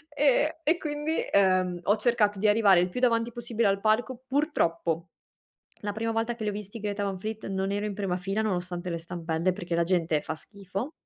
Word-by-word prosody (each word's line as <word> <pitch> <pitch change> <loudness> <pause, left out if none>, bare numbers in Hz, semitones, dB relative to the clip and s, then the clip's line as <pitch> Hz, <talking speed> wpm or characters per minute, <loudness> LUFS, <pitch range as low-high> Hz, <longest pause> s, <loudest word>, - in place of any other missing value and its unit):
Ehm 295 +1 +4
e 320 +3 +3
quindi, 300 0 -2
uhm, 185 -2 +3
ho 205 - +4
cercato 210 -3 +2
di 215 - +3
arrivare 205 -3 +6
il 180 +1 +1
più 215 - -4
davanti 235 -2 +2
possibile 235 -1 -1
al 195 0 +2
palco. 240 +4 +1
Purtroppo, 170 - 0 0.7
la 205 0 -3
prima 225 +2 -2
volta 225 +1 0
che 230 -2 -6
li 210 - +1
ho - - -5
visti 205 +1 -7
i - - -11
Greta 205 0 -2
Van 195 -1 -2
Fleet, 215 +3 -5
non 195 0 -1
ero 205 +1 -1
in 210 - -3
prima 195 -3 -1
fila 195 +4 -1
nonostante 180 -3 -2
le 170 - -2
stampelle, 170 +1 -1
perché 180 -2 -4
la 170 - +3
gente 165 -3 +1
fa - - -4
schifo. 200 - -6
205 Hz, 210 wpm, -28 LUFS, 180-230 Hz, 0.7 s, arrivare